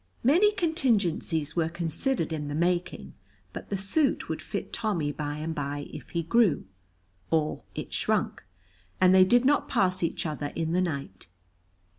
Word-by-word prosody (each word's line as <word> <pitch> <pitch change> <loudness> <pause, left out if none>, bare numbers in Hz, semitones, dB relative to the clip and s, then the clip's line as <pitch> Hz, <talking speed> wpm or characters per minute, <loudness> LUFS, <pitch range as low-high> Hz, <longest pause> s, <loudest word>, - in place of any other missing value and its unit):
Many 350 - +5
contingencies 215 - 0
were 165 -2 +1
considered 170 - -1
in 150 -2 -3
the 145 - -4
making, 175 +2 -1 0.4
but - - -8
the 200 - -1
suit 200 +10 +1
would - - -3
fit - - -5
Tommy 195 -10 -1
by 145 0 -4
and 160 +2 -3
by 145 -1 -4
if - - -9
he 170 -1 -2
grew, 210 0 +2 0.6
or 155 -2 0
it - - -6
shrunk, - - 0 0.6
and 185 0 +6
they 190 0 +8
did 240 +6 +4
not 290 +1 +2
pass 185 0 +1
each 170 - -1
other 150 -2 -3
in 165 -1 -1
the 180 +2 +2
night. 140 - -4
175 Hz, 160 wpm, -27 LUFS, 155-215 Hz, 0.6 s, they